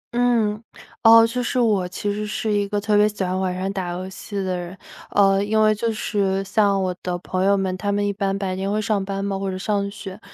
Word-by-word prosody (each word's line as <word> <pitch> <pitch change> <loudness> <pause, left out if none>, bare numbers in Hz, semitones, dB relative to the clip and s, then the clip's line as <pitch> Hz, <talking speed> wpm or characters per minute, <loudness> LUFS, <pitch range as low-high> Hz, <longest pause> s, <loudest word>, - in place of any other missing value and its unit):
嗯， 230 -3 +1 0.4
哦， 225 0 +8
就 250 +2 -2
是 250 +1 -1
我 205 -6 +2
其 205 +3 -3
实 210 +1 -3
是 215 0 -2
一 205 -1 +1
个 205 0 -1
特 210 0 0
别 210 +1 +5
喜 205 -2 -4
欢 185 0 -1
晚 185 -1 -1
上 190 +1 -2
打 185 -3 -3
游 185 +1 -5
戏 195 +2 -9
的 190 -2 -1
人， 175 +1 -6 0.3
呃， 195 -1 +3
因 215 +1 +1
为 215 0 +5
就 225 +2 -1
是 195 -3 -1
像 200 0 +2
我 185 -1 -1
的 180 -1 -2
朋 185 +1 -3
友 200 +1 +4
们， 190 -1 -1
他 200 +2 -2
们 205 0 0
一 200 - 0
般 195 0 -1
白 190 -2 -2
天 195 +1 -2
会 210 - 0
上 210 -2 0
班 195 0 -3
嘛， 195 -1 -2
或 195 0 -2
者 185 - -4
上 200 +1 -1
学， 200 -1 -9
200 Hz, 265 characters per minute, -22 LUFS, 190-210 Hz, 0.4 s, 哦